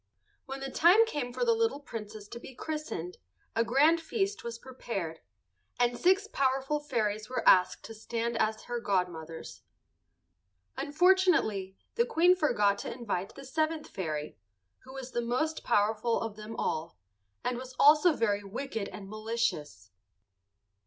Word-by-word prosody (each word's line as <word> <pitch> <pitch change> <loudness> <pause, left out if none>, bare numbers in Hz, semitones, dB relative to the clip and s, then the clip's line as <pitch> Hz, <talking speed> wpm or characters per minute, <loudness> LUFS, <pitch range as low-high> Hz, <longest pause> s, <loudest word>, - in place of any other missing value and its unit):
When 270 0 -6
the 270 0 -4
time 365 +11 +6
came 290 - -3
for - - -1
the 465 - +4
little 455 -8 +1
Princess 215 -6 -8
to 235 - -7
be 255 +1 -11
christened, 300 - -5 0.4
a 230 - +3
grand 295 +8 +4
feast 395 +4 -2
was 235 -1 -5
prepared, 230 -10 -5 0.6
and 245 0 +3
six 380 - +3
powerful 270 -2 0
fairies 215 -7 -2
were 255 - -2
asked 180 -1 +5
to 225 - -8
stand 230 +2 -3
as 215 0 0
her 240 0 -3
godmothers. 175 -6 -3 1.1
Unfortunately 305 - +2 0.2
the 470 - +2
Queen 360 -5 +5
forgot 210 - +2
to - - -5
invite 205 -6 -4
the 275 - -10
seventh 310 +3 -1
fairy, 155 -5 -4 0.5
who 260 - -11
was 265 -1 -7
the 240 - -1
most 255 +7 -1
powerful 220 +3 +2
of 225 -2 -4
them 215 +1 -8
all, 160 +2 -3 0.5
and 245 -1 -1
was 255 0 -9
also 300 +4 +7
very 205 -6 0
wicked 220 0 -4
and 195 -2 -9
malicious. 215 - -3
240 Hz, 145 wpm, -30 LUFS, 205-300 Hz, 1.1 s, also